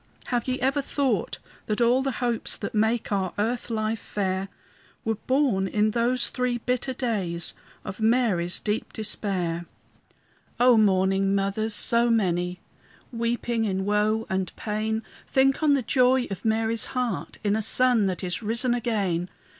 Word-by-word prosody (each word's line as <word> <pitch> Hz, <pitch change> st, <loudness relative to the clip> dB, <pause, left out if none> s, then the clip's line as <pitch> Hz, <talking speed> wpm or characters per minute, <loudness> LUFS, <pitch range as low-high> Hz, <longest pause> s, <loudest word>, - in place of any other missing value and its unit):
Have 240 Hz, 0 st, 0 dB
ye 255 Hz, 0 st, -1 dB
ever 270 Hz, +3 st, +1 dB
thought 265 Hz, -, -1 dB, 0.3 s
that 215 Hz, +1 st, -1 dB
all 240 Hz, +2 st, +4 dB
the 270 Hz, -1 st, -1 dB
hopes 240 Hz, -2 st, +1 dB
That 200 Hz, -, -5 dB
make 220 Hz, +2 st, 0 dB
our 190 Hz, -2 st, -1 dB
earth 235 Hz, +4 st, -1 dB
life 220 Hz, -1 st, -1 dB
fair, 190 Hz, -2 st, -2 dB, 0.6 s
Were 225 Hz, -, +1 dB
born 255 Hz, -8 st, +2 dB
in 210 Hz, +2 st, +1 dB
those 240 Hz, +2 st, 0 dB
three 250 Hz, -1 st, -1 dB
bitter 250 Hz, +2 st, -2 dB
days 195 Hz, -10 st, -2 dB, 0.3 s
Of 190 Hz, -, -6 dB
Mary's 220 Hz, -7 st, +2 dB
deep 210 Hz, +1 st, -3 dB
despair? 185 Hz, -6 st, -2 dB, 0.9 s
O 245 Hz, 0 st, +6 dB
mourning 195 Hz, -2 st, +3 dB
mothers, 200 Hz, +2 st, -1 dB
so 235 Hz, +2 st, +3 dB
many, 180 Hz, -5 st, 0 dB, 0.5 s
Weeping 235 Hz, 0 st, -1 dB
in 190 Hz, -2 st, -1 dB
woe 210 Hz, +2 st, +1 dB
and 190 Hz, -1 st, -2 dB
pain, 220 Hz, +1 st, -2 dB, 0.2 s
Think 270 Hz, +2 st, +2 dB
on 295 Hz, -2 st, +4 dB
the 270 Hz, -, -1 dB
joy 255 Hz, +1 st, +3 dB
of 195 Hz, -, -5 dB
Mary's 225 Hz, 0 st, +1 dB
heart 245 Hz, -5 st, -2 dB
In 205 Hz, 0 st, +1 dB
a 220 Hz, -, 0 dB
Son 235 Hz, -1 st, +4 dB
that 185 Hz, 0 st, -3 dB
is 180 Hz, +2 st, -2 dB
risen 235 Hz, +3 st, +1 dB
again. 200 Hz, -8 st, -1 dB
220 Hz, 150 wpm, -25 LUFS, 195-245 Hz, 0.9 s, O